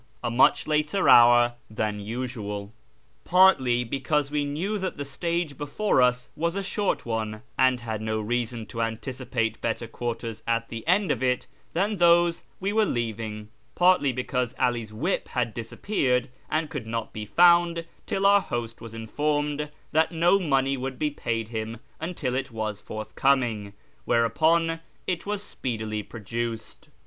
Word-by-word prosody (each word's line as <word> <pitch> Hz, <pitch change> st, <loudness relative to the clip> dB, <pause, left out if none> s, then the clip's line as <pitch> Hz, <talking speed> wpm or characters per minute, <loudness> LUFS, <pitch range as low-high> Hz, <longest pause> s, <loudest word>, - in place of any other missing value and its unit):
(a 120 Hz, -, -1 dB
much 120 Hz, +3 st, +4 dB
later 155 Hz, +5 st, +1 dB
hour 120 Hz, 0 st, +7 dB, 0.2 s
than 110 Hz, -1 st, -2 dB
usual), 105 Hz, -2 st, -5 dB, 0.5 s
partly 135 Hz, -10 st, +5 dB
because 140 Hz, +4 st, -1 dB
we 150 Hz, -1 st, +1 dB
knew 170 Hz, +9 st, -2 dB
that 190 Hz, -1 st, -3 dB
the 145 Hz, -, -4 dB
stage 170 Hz, 0 st, -2 dB
before 145 Hz, +2 st, +1 dB
us 125 Hz, 0 st, +2 dB
was 170 Hz, +3 st, -1 dB
a 200 Hz, -, -2 dB
short 200 Hz, +1 st, -1 dB
one, 110 Hz, -1 st, -3 dB
and 130 Hz, -1 st, +3 dB
had 110 Hz, -2 st, -4 dB
no 110 Hz, 0 st, -1 dB
reason 120 Hz, +1 st, -2 dB
to 115 Hz, -, -5 dB
anticipate 115 Hz, 0 st, -2 dB
better 115 Hz, 0 st, -1 dB
quarters 115 Hz, -1 st, -4 dB
at 115 Hz, 0 st, 0 dB
the 115 Hz, -1 st, -6 dB
end 185 Hz, +3 st, +3 dB
of -, -, -1 dB
it 125 Hz, -1 st, +1 dB, 0.3 s
than 200 Hz, +5 st, 0 dB
those 170 Hz, -1 st, +4 dB, 0.2 s
we 195 Hz, +2 st, -1 dB
were 220 Hz, 0 st, +4 dB
leaving; 110 Hz, -, -3 dB, 0.3 s
partly 180 Hz, -6 st, +4 dB
because 125 Hz, 0 st, -2 dB
'All's 120 Hz, -3 st, 0 dB
whip 150 Hz, -, -1 dB
had 120 Hz, -3 st, -1 dB
disappeared, 125 Hz, -, -1 dB, 0.2 s
and 155 Hz, 0 st, -1 dB
could 125 Hz, -7 st, -5 dB
not 115 Hz, 0 st, -3 dB
be 105 Hz, -1 st, -6 dB
found 170 Hz, -, +5 dB, 0.2 s
till 195 Hz, 0 st, 0 dB
our 200 Hz, 0 st, +6 dB
host 120 Hz, -7 st, -4 dB
was 115 Hz, -1 st, -9 dB
informed 145 Hz, +5 st, -1 dB, 0.2 s
that 160 Hz, +2 st, +3 dB
no 175 Hz, +4 st, +4 dB
money 135 Hz, -5 st, +1 dB
would 130 Hz, 0 st, -4 dB
be 150 Hz, +2 st, 0 dB
paid 115 Hz, -5 st, -3 dB
him 110 Hz, 0 st, -4 dB, 0.2 s
until 160 Hz, -6 st, -3 dB
it 130 Hz, +1 st, -2 dB
was 110 Hz, -3 st, -4 dB
forth 110 Hz, 0 st, -7 dB
coming; 120 Hz, -7 st, +1 dB, 0.3 s
whereupon 160 Hz, +8 st, +2 dB, 0.3 s
it 180 Hz, +1 st, -2 dB
was 205 Hz, 0 st, -2 dB
speedily 110 Hz, -, -3 dB
produced. 115 Hz, +1 st, -6 dB
125 Hz, 155 wpm, -26 LUFS, 115-165 Hz, 0.5 s, hour